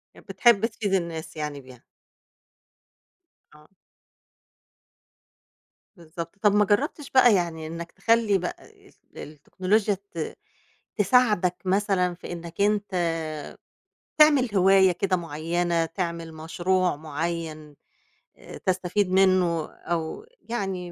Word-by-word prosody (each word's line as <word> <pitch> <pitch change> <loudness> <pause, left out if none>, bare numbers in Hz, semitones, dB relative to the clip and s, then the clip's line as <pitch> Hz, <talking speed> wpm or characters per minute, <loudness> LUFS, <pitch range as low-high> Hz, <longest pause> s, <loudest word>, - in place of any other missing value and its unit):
يع - - -15
بتحب 230 -3 +4
تفيد 215 -3 -3
الناس 165 -3 -2
يعني 150 -2 -4
بيها. 130 -2 -16 1.7
آه. 150 0 -19 2.3
بالضبط، 170 0 -8
طَب 210 -2 +4
ما 210 0 +4
جرّبتش 280 - -1
بقى 245 -4 +6
يعني 165 -3 -2
إنّك 165 +1 -7
تخلّي 220 0 +2
بقى 180 -1 -6
ال - - -22 0.2
التكنولوجيا 185 +8 -1 0.2
ت 165 -2 -5 0.6
تساعدك 205 -4 +3
مثلًا 190 -2 +1
في 175 - -10
إنّك 170 +1 -6
أنت 205 -1 +1 1.3
تعمل 280 -8 +5
هواية 190 0 +5
كده 185 +2 0
معيّنة، 170 +1 -1
تعمل 170 -1 -5
مشروع 175 +3 0
معيّن 155 0 -5 0.6
آآ، - - -11
تستفيد 185 +1 -1
منّه 185 -4 +3
أو 170 - -4 0.2
يعني 195 -6 -3
180 Hz, 105 wpm, -25 LUFS, 165-200 Hz, 2.3 s, بقى